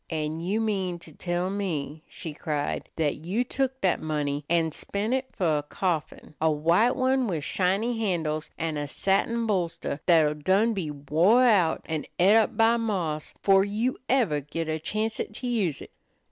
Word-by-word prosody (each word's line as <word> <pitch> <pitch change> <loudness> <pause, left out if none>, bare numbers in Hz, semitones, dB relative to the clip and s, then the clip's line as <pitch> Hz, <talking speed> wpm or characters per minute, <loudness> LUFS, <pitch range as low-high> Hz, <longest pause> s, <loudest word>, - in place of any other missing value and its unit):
"An' 155 0 -2
you 190 +6 -1
mean 195 -5 -1
to 170 -1 -12
tell 175 +1 -2
me," 160 -7 -3
she 160 - -7
cried, 150 -1 -3
"that 155 -3 0
you 185 +11 -1
took 265 +1 -2
that 185 -3 +1
money 150 -2 -2
an' 165 -1 +2
spent 205 +8 -2
it 265 0 -1
for 160 -6 +1
a - - -3
coffin, 160 +1 -3
a 160 - +4
white 170 +11 +3
one 260 -1 +2
with 165 -7 -2
shiny 200 +8 0
handles, 160 -7 -1
an' 160 -1 -2
a 145 0 -3
satin 215 +9 0
bolster 175 -8 -2
that'll 160 -4 +5
done 190 +10 +2
be 185 -7 -3
wore 160 - +3
out, 195 -9 +3
an' 160 -2 -3
et 190 +4 +5
up 225 -1 +3
by 225 +1 +4
moths, 180 -10 -2
'fore 195 -1 +5
you 215 +6 -1
ever 225 - +2
git 155 +3 -4
a 155 0 -2
chancet 215 +4 -3
to 250 - -5
use 200 - -1
it?" - - -14
180 Hz, 175 wpm, -26 LUFS, 155-220 Hz, -, that'll